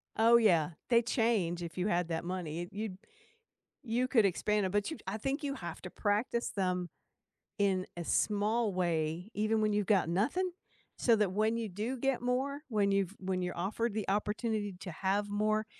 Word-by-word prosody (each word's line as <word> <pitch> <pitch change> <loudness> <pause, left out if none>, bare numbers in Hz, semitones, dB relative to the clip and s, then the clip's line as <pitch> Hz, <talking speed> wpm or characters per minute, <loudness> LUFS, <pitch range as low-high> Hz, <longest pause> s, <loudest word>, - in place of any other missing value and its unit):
Oh 230 +2 +6
yeah. 175 -9 +4 0.2
They 235 -1 +6
change 225 -8 +1
if 170 +1 -7
you 180 +2 0
had 175 -3 +1
that 165 -1 -2
money. 175 -2 -3
It 175 - -6
you 205 -2 -4 0.9
You 250 0 0
could 235 -5 +4
expand 205 +2 +1
it, 185 - -3
but 205 +4 +1
you 320 - -6
I 195 +3 -3
think 270 +6 -2
you 280 -1 -2
have 170 -10 -7
to 180 - -7
practice 215 +5 0
them 180 -2 -1 0.7
in 190 -2 +2
a 170 - -4
small 210 +4 +1
way 170 +1 -1
even 215 +1 +1
when 215 0 +2
you've 205 -1 +1
got 195 -6 +3
nothing 290 - +1 0.5
so 230 -2 +4
that 210 -3 +1
when 215 +3 +1
you 230 -1 -2
do 215 +7 -3
get 270 0 +1
more, 265 +3 0
when 210 -4 +2
you've 195 -1 +1
when 185 -1 -1
you're 180 0 -3
offered 205 +5 -1
the 215 -2 -3
opportunity 210 0 -1
to 180 - -6
have 195 +4 0
more, 215 +1 +1
205 Hz, 190 wpm, -32 LUFS, 185-225 Hz, 0.9 s, Oh